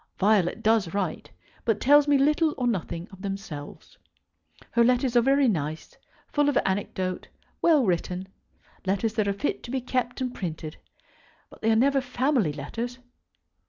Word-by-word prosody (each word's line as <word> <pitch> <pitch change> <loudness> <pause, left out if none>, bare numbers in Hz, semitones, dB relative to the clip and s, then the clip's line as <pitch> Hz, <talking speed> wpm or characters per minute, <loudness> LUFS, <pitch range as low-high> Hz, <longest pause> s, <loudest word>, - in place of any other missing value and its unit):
Violet 195 -3 +2
does 215 -5 +2
write, 185 -6 -2 0.3
but 225 - +1
tells 290 +2 +5
me 290 -1 +5
little 300 +3 +2
or 250 - -1
nothing 180 -6 -2
of 190 -1 -13
themselves. 195 -7 -7 0.7
Her 235 - +4
letters 250 +1 +2
are 240 - +6
very 275 +2 +3
nice, 155 -6 -2 0.4
full 290 -1 +3
of 285 - +1
anecdote, 190 -1 -2 0.3
well 310 -7 +4
written, 180 0 -1 0.6
letters 200 +3 0
that 215 -3 0
are - - +2
fit 200 +9 -2
to - - -10
be 265 +1 -1
kept 250 0 -2
and 255 -1 -2
printed; 160 -5 -5 0.7
but - - -16
they 225 - +1
are 225 - +4
never 275 +4 +3
family 255 - +1
letters. 230 - -5
225 Hz, 160 wpm, -26 LUFS, 185-260 Hz, 0.7 s, are